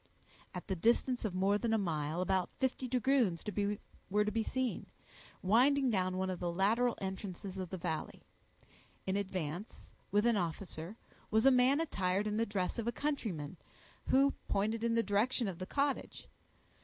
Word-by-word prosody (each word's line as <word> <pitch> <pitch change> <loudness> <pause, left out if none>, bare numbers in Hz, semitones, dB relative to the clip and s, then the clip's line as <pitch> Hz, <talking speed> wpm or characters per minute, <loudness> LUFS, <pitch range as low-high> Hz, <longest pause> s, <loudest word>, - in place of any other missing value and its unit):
At - - -5
the 190 - -2
distance 235 +6 +2
of 195 -4 -2
more 195 +2 +2
than 225 -1 +1
a - - +3
mile, 160 -3 -1
about 185 -1 +1
fifty 260 -1 -1
dragoons 250 -8 +2 0.7
were 210 +2 +2
to 210 - 0
be 225 +2 0
seen, 260 +1 -2 0.6
winding 255 +6 +4
down 185 -2 0
one 190 0 0
of 180 - -4
the 175 -1 -1
lateral 225 +7 +2
entrances 190 0 -5
of 185 -2 -4
the 190 - -4
valley. 165 -2 -4 0.8
In 190 - 0
advance, 185 -1 -4 0.2
with 205 +3 +3
an 235 -2 +4
officer, 175 +1 -4 0.3
was 220 +2 +3
a 270 - +8
man 255 +3 +4
attired 200 - 0
in 210 0 -1
the 230 +1 +1
dress 200 +2 -1
of 230 - -2
a - - +2
countryman, 215 - -3 0.5
who 275 +1 +4
pointed 220 +3 0
in 230 0 +2
the 230 - +3
direction 215 +4 +1
of 185 -3 -5
the 185 - -5
cottage. 280 +2 -1
205 Hz, 170 wpm, -34 LUFS, 185-240 Hz, 0.8 s, a